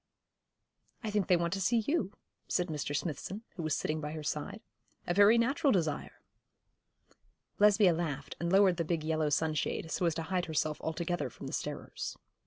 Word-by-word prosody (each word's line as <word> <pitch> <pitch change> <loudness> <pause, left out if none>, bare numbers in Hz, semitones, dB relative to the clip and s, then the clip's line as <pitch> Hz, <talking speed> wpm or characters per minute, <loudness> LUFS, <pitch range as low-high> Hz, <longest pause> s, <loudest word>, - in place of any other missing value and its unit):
'I 215 - -2
think 205 -2 +1
they 180 - +5
want 170 +1 -1
to 195 - -2
see 235 +6 +3
you,' 260 - 0 0.4
said 180 -1 0
Mr. 145 -1 -3
Smithson, 180 - -3
who - - -5
was 155 -2 0
sitting 155 0 -2
by 150 0 -4
her 155 -1 -5
side. 150 +8 -3 0.4
'A 175 - 0
very 205 +4 +6
natural 270 +4 +2
desire.' 160 - -1 1.4
Lesbia 205 -3 +6
laughed, 155 -4 -3
and 170 +1 -1
lowered 190 -2 +5
the 170 - +1
big 165 -1 -1
yellow 155 -1 +1
sunshade, 155 +1 -1
so 175 - +1
as 165 - 0
to 165 - -2
hide 180 +1 -1
herself 155 -1 -1
altogether 170 -2 -2
from 115 - -11
the - - -6
starers. - - -4
170 Hz, 180 wpm, -32 LUFS, 155-195 Hz, 1.4 s, very